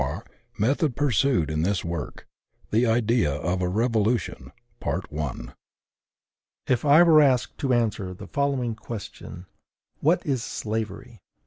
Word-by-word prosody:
CHAPTER 70 +11 -4
I. 115 -2 -14
METHOD 135 +3 +1
PURSUED 130 - +1
IN 75 0 -1
THIS 95 +2 0
WORK. 85 -2 -5 0.4
THE 115 +3 +3
IDEA 115 - +2
OF 90 +5 -2
A 90 - 0
REVOLUTION. 110 0 0 2.1
If 125 - +1
I 150 +3 +7
were 160 -3 +7
asked 130 -4 +2
to 135 -4 0
answer 110 -5 0
the - - -10
following 140 -4 -1
question: 105 -5 -8 0.5
WHAT 170 +5 +2
IS 135 -6 0
SLAVERY? 110 -1 -5
115 Hz, 125 wpm, -25 LUFS, 95-135 Hz, 2.1 s, I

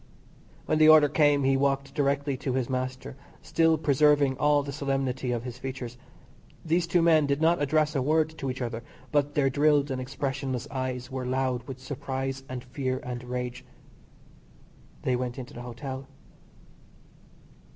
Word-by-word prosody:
When 155 - +1
the 155 0 +7
order 155 -1 +8
came 145 -1 +3
he 135 0 +3
walked 135 0 0
directly 140 -1 0
to 130 0 -3
his 130 0 -1
master, 130 0 -3 0.3
still 165 -1 +3
preserving 145 -2 +3
all 145 -1 +3
the 140 - -5
solemnity 135 -3 -2
of 120 -1 -2
his 125 0 -7
features. 130 -2 -6 0.7
These 170 +2 +1
two 170 0 +3
men 160 -3 +5
did 140 0 +1
not 165 +1 +3
address 150 +1 +2
a 135 - +2
word 155 +3 +1
to 135 - -2
each 130 0 -3
other, 115 -1 -4 0.3
but 145 -1 +1
their 135 -2 +3
drilled 145 0 +3
and 130 -1 -2
expressionless 135 0 -3
eyes 130 -1 -4
were 130 -1 -4
loud 130 -2 -1
with 135 -2 -6
surprise 135 0 -4
and 125 -1 -5
fear 130 0 -3
and 125 -1 -5
rage. 125 0 -4 1.4
They 130 - +1
went 125 -1 -3
into 125 -1 -8
the 120 - -8
Hotel. 130 +2 -7
135 Hz, 160 wpm, -27 LUFS, 130-145 Hz, 1.4 s, order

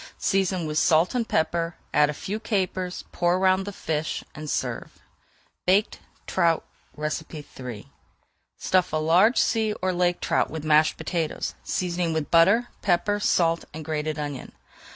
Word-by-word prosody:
Season 190 -3 0
with 155 0 0
salt 165 +2 +3
and 240 -3 -1
pepper, 165 +1 0 0.2
add 150 0 +4
a - - -2
few 205 +8 -4
capers, 185 -4 -2
pour 175 0 +1
around 190 0 +2
the 205 - -5
fish, 160 -4 -3
and 155 0 -7
serve. - - -3 0.7
BAKED 195 +4 +2 0.3
TROUT 170 -3 +1 0.3
III 150 -7 -6 0.7
Stuff 185 -1 +1
a - - +2
large 175 +10 +4
sea 220 -2 +2
or 185 -2 -2
lake 175 0 +1
trout - - +1
with 160 -1 -6
mashed 155 0 +4
potatoes, 160 -1 -2
seasoning 175 -2 -1
with 160 -2 -3
butter, 200 +9 +5
pepper, 205 +2 +1
salt, 170 -4 +2
and 160 -1 -7
grated 155 -1 -2
onion. 145 -3 -5
170 Hz, 145 wpm, -25 LUFS, 155-185 Hz, 0.7 s, butter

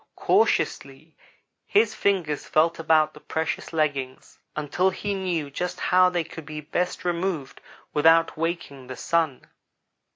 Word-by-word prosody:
Cautiously 140 +4 0 0.5
his 425 +2 +3
fingers 175 -7 0
felt 165 +2 +2
about 155 -1 +3
the 150 - -13
precious 160 +1 -3
leggings 140 -5 -2 0.2
until 155 +5 +1
he 200 +2 -3
knew 175 -7 -2
just 180 +5 -4
how 185 0 +4
they 175 -2 -1
could 160 -2 -10 0.2
best 180 +1 -1
be - - -3
removed 170 -5 -3 0.3
without 165 +2 +4
waking 155 -5 -4
the 130 - -6
Sun. 160 -6 0
165 Hz, 130 wpm, -25 LUFS, 150-180 Hz, 0.5 s, how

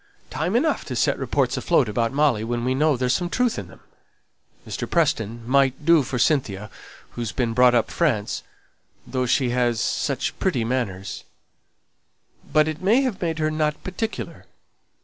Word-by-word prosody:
Time 160 - -1
enough 310 +6 +1
to - - -5
set - - +1
reports - - 0
afloat 155 -8 +2
about 115 +2 0
Molly 140 -6 +2
when 120 +1 -2
we 130 - +1
know 150 +1 +2
there's 125 0 +1
some 175 -1 -1
truth 250 +3 0
in - - -7
them. - - -16 0.9
Mr. - - -4
Preston 115 -8 0
might 135 +2 +2
do 165 -1 +6
for 125 -1 -3
Cynthia, 110 -7 0 0.4
who's 120 -3 -4
been 120 -3 -1
brought 125 +1 +5
up 115 - +2
in - - -9
France, 120 -12 0 0.6
though 130 -1 -2
she 125 0 +2
has 120 -2 +1
such - - -1
pretty 115 - 0
manners; 105 -6 -3 1.3
but 155 0 +4
it 155 +1 -4
may 215 +8 +4
have 255 -8 -2
made 165 -3 -1
her 155 -1 0
not 155 -1 -1
particular. 215 +5 -5
130 Hz, 170 wpm, -23 LUFS, 120-160 Hz, 1.3 s, do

